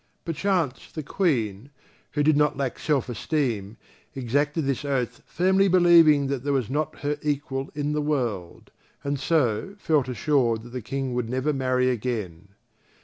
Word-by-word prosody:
Perchance, 165 -4 -1
the 155 - -5
Queen, 130 - -1 0.4
who 145 - +1
did 155 0 +4
not 150 -1 +2
lack 135 -3 -2
self 145 -5 0
esteem, 120 -4 -2 0.4
exacted 145 +4 0
this 135 0 -1
oath 135 -4 -2
firmly 190 +3 +3
believing 170 -5 +6
that 135 -2 -2
there 145 0 0
was 130 -3 -1
not 150 +2 -2
her 145 0 -1
equal 140 -2 -2
in 145 0 -1
the 150 - 0
world, 120 - -3 0.3
and 140 -1 -2
so 135 - 0
felt 155 -8 +1
assured 120 -3 +1
that 120 - -11
the 125 +1 -5
King 130 +2 -3
would 120 -2 -2
never 130 +4 0
marry 130 -1 +1
again. 105 -8 -3
140 Hz, 155 wpm, -25 LUFS, 125-150 Hz, 0.4 s, believing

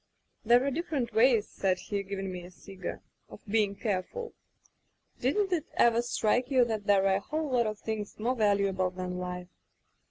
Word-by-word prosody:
* - - -47
"'There 240 +3 +5
are 280 - +1
different 275 -7 -2
ways,' 225 -1 +4
said 185 -2 0
he, 200 +1 -3
giv 195 0 -5
ing 195 -1 -3
me 180 -1 -6
a 175 - -10
cigar, 185 0 -8 0.3
*of - - -11
being 205 -1 +1
careful. 225 - -3 0.9
Didn't 370 +10 +1
it 325 -4 -1
ever 235 0 +4
strike 240 +1 +1
you 255 -3 +4
that 220 -3 -3
there 195 -1 +4
are 195 0 +4
a - - -2
whole 305 +7 -3
lot 240 -3 +2
of 215 -1 -3
things 215 -1 -5
more 235 +4 0
valuable 200 -4 +2
than 180 0 -5
life? 180 0 -5
215 Hz, 190 wpm, -29 LUFS, 195-245 Hz, 0.9 s, There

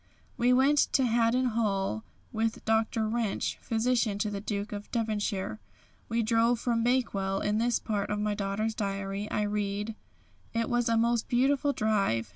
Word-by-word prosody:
We 245 +1 +2
went 270 +3 +4
to 265 - +4
Haddon 240 +2 +2
Hall 195 - 0 0.3
with 225 0 -1
Dr. 220 0 +1
Wrench, 225 -2 -1
physician 230 -2 +1
to 210 +1 -1
the 200 -1 -4
Duke 205 0 -3
of 205 0 -6
Devonshire. 215 -3 -2 0.5
We 230 0 +1
drove 230 +1 +2
from 230 -1 0
Bakewell. 205 -6 +1
In 210 +1 +1
this 235 +1 +2
part 205 -3 -2
of 210 - -1
my 210 0 0
daughter's 205 +2 -1
diary 195 0 -3
I 210 - 0
read: 205 +1 -2 0.6
"It 230 -1 0
was 240 -1 +2
a 230 - +3
most 235 0 +1
beautiful 275 +3 +2
drive. 195 - 0
220 Hz, 160 wpm, -29 LUFS, 205-235 Hz, 0.6 s, went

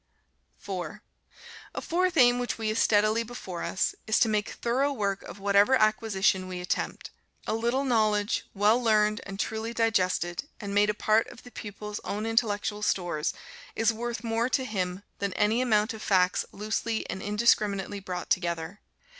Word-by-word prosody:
4. 190 +2 -6 0.7
A - - -1
fourth 360 +1 0
aim 245 -2 +6
which 245 - -2
we 220 -1 -2
have 215 +1 0
steadily 215 +1 +3
before 220 -7 -6
us, 190 - 0
is 220 - +3
to 235 - +4
make 210 -1 0
thorough 265 +4 0
work 200 -6 -1
of - - -10
whatever 200 +5 +4
acquisition 215 -4 +2
we 180 -1 -5
attempt. 180 - -3 0.3
A - - -1
little 235 +4 0
knowledge, 215 -4 +1
well 210 +5 +4
learned 215 -2 +3
and 195 0 -7
truly 220 +2 -3
digested, 185 -2 +1
and 200 -2 -5
made 205 +1 +4
a 210 - 0
part 215 +1 +2
of - - -13
the 245 - -13
pupil's 210 -1 -7
own 210 +2 -4
intellectual 215 -2 0
stores, 175 -6 0 0.4
is 225 +1 +2
worth 240 +2 -4
more 230 +1 0
to 260 0 +1
him 190 -4 -3 0.2
than 200 -2 -2
any 215 +5 +2
amount 220 -3 +2
of 220 - -9
facts 185 -4 +2
loosely 215 +2 -2
and 190 - -5
indiscriminately 205 -2 +1
brought 180 -2 -6
together. 170 +1 -1
210 Hz, 165 wpm, -28 LUFS, 200-230 Hz, 0.7 s, aim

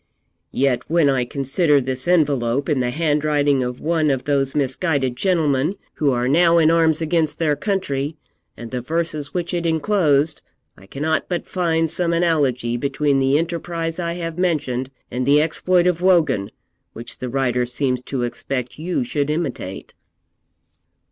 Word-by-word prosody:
'Yet 130 -2 +1
when 165 -3 +3
I 130 -2 0
consider 140 +4 +1
this 130 +1 -3
envelope 140 -6 +2
in 145 -4 +1
the 125 -1 0
handwriting 145 -1 +1
of 125 0 -3
one 160 -1 +1
of 135 -2 0
those 140 -1 0
misguided 140 -2 0
gentlemen 155 -1 +1 0.2
who 150 - +1
are 125 -1 0
now 170 +4 +4
in 160 -1 +5
arms 165 -1 +3
against 160 -1 0
their 155 -3 +1
country, 155 -7 -2 0.4
and 120 -1 -9
the 125 -1 -3
verses 155 +1 -3
which 175 0 -2
it 175 -1 -1
enclosed, 160 -3 +1 0.3
I 95 - -17
cannot 155 +7 -2
but 175 -2 -2
find 165 -3 0
some 170 +1 -1
analogy 140 -8 +1
between 140 +2 0
the 135 +2 +3
enterprise 165 0 -3
I 170 -1 -2
have 165 -1 -5
mentioned 135 -8 -1 0.2
and 125 +1 -2
the 140 +3 +4
exploit 175 +3 +1
of 180 -1 +1
Wogan, 155 - +2 0.4
which 115 +1 -9
the 125 - -4
writer 125 -1 0
seems 125 0 -1
to 130 -3 -2
expect 125 +2 -4
you 180 - -1
should 150 - -2
imitate.' 150 - -4
150 Hz, 155 wpm, -21 LUFS, 130-165 Hz, 0.4 s, in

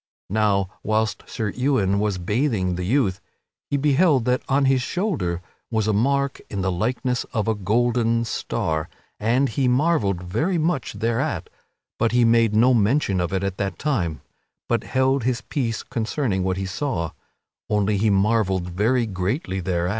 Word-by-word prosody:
Now, 100 -2 +2
whilst 110 0 -1
Sir 110 -4 -2
Ewain 110 -7 +1
was 105 -2 0
bathing 105 0 0
the 90 +1 -3
youth, 105 -4 +1 0.5
he 140 - +1
beheld 145 -2 +3
that 125 0 +1
on 135 +1 +3
his 130 -1 +3
shoulder 125 - -2 0.3
was 110 -2 0
a 110 - +2
mark 140 +5 +1
in 100 - -3
the 95 - +1
likeness 125 +6 -1
of 110 -3 0
a 110 - +3
golden 115 +3 +1
star 80 -8 -2 0.3
and 120 +6 +2
he 130 +4 0
marvelled 125 - +2
very 150 - 0
much 155 -5 -1
thereat; 120 +6 -2 0.5
but 115 0 +1
he 120 -1 +4
made 115 -2 +3
no 120 +4 +5
mention 105 -4 +2
of 85 - -2
it 95 0 -1
at 95 -1 -2
that 95 -3 -2
time, 95 - -1 0.5
but - - 0
held 130 0 +1
his 120 -1 0
peace 115 -2 -2
concerning 115 -3 -1
what 95 0 0
he 95 - -2
saw; 95 - -2 0.6
only 105 0 +1
he 110 +2 +2
marvelled 95 -3 +1
very 115 +7 +1
greatly 95 - -2
thereat. 90 -1 -1
110 Hz, 160 wpm, -23 LUFS, 95-130 Hz, 0.6 s, no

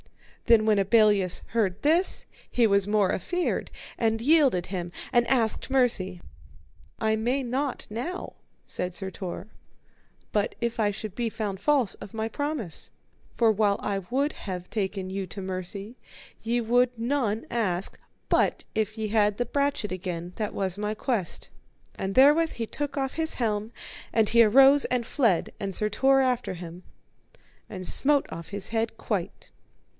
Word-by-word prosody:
Then 230 -2 +6
when 215 -2 +3
Abelleus 200 -2 +3
heard 205 -5 0
this, 330 +6 +3 0.2
he 240 - +3
was 200 -1 +2
more 205 -2 +2
afeard, 355 - -1 0.3
and 225 -1 +1
yielded 265 - +4
him 175 -2 -4 0.2
and 240 0 +4
asked 230 -5 +1
mercy. 220 -9 +1 0.8
I 220 0 +2
may 245 +5 0
not 260 +2 -2
now, 255 - -5 0.3
said 180 0 -3
Sir 190 -1 -4
Tor, 185 +2 -6 0.9
but 205 -1 0
if 235 -1 -2
I 210 -2 +3
should 210 -1 -6
be 235 -2 -1
found 210 -4 -4
false 270 -2 +2
of 205 - -9
my 220 0 -1
promise; 280 - -4 0.5
for 230 -2 +4
while 210 -1 +2
I 200 -1 -1
would 280 +4 0
have 180 -2 -6
taken 195 -3 -2
you 195 0 -3
to 195 +3 -7
mercy 190 +4 -5 0.5
ye 235 +2 0
would 245 +2 +3
none 230 -3 -1
ask, 195 -6 -1 0.3
but - - +1
if 220 0 -1
ye 215 -1 -2
had 210 -1 +2
the 245 - 0
brachet 280 -4 -1
again, 180 -1 -5
that 215 -2 -3
was 190 -1 -2
my 210 +1 -2
quest. 220 -6 -2 0.5
And 190 0 -3
therewith 300 +5 +5
he 230 - -3
took 290 +5 -5
off 270 -1 -1
his 320 0 -2
helm, 215 -2 -1 0.4
and 220 -2 +3
he 235 +1 +6
arose 270 +6 +6
and 245 -2 -1
fled, 225 - +1
and 195 -2 -3
Sir 210 - 0
Tor 270 +5 +4
after 250 -7 0
him, 175 0 -9 0.9
and 185 -2 -4
smote 285 0 +4
off 170 -1 -7
his 200 0 -5
head 225 0 -1
quite. - - -4
220 Hz, 160 wpm, -27 LUFS, 195-250 Hz, 0.9 s, Then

